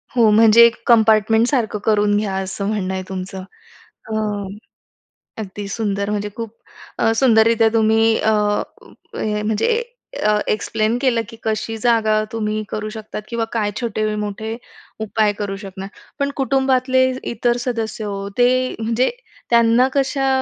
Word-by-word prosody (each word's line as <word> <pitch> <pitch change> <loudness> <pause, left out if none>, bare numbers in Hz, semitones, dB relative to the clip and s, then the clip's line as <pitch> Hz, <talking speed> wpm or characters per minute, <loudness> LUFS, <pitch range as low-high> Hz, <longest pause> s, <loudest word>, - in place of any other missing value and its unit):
हो. 230 -3 +5
म्हणजे 225 +2 +7
एक 235 0 +3
कंपार्टमेंटसारखं 220 0 +3
करून 210 -1 +3
घ्या 200 -2 -2
असं 190 +1 -3
म्हणणं 195 -3 -2
आहे 185 - -3
तुमचं. 190 0 -6 0.7
अ, - - -4 1.3
अगदी 205 0 -6
सुंदर 200 -2 -2
म्हणजे 210 0 -2
खूप 230 -1 -6 0.4
अ, 225 -1 +3
सुंदररीत्या 225 -2 +4
तुम्ही 225 0 +3
अ, 220 - +2 0.8
म्हणजे 215 - 0 0.4
अ, 210 0 +3
एक्सप्लेन 215 +1 0
केलं 255 -4 +2
की 230 - -11
कशी 220 +1 -2
जागा 220 -2 +2
तुम्ही 215 -1 -2
करू 215 0 -4
शकतात 215 -1 -7
किंवा 235 -1 -1
काय 215 -3 0
छोटे-मोठे 215 -1 -3 0.4
उपाय 215 -1 +1
करू 200 -1 -3
शकणार. 195 -1 -8 0.3
पण 280 0 0
कुटुंबातले 260 -1 +2 0.2
इतर 240 +1 0
सदस्य 225 -3 -3 0.3
ते 245 0 +5 0.3
म्हणजे 230 +3 +1 0.4
त्यांना 235 +2 +4
कशा 270 0 +1
220 Hz, 125 wpm, -19 LUFS, 210-235 Hz, 1.3 s, म्हणजे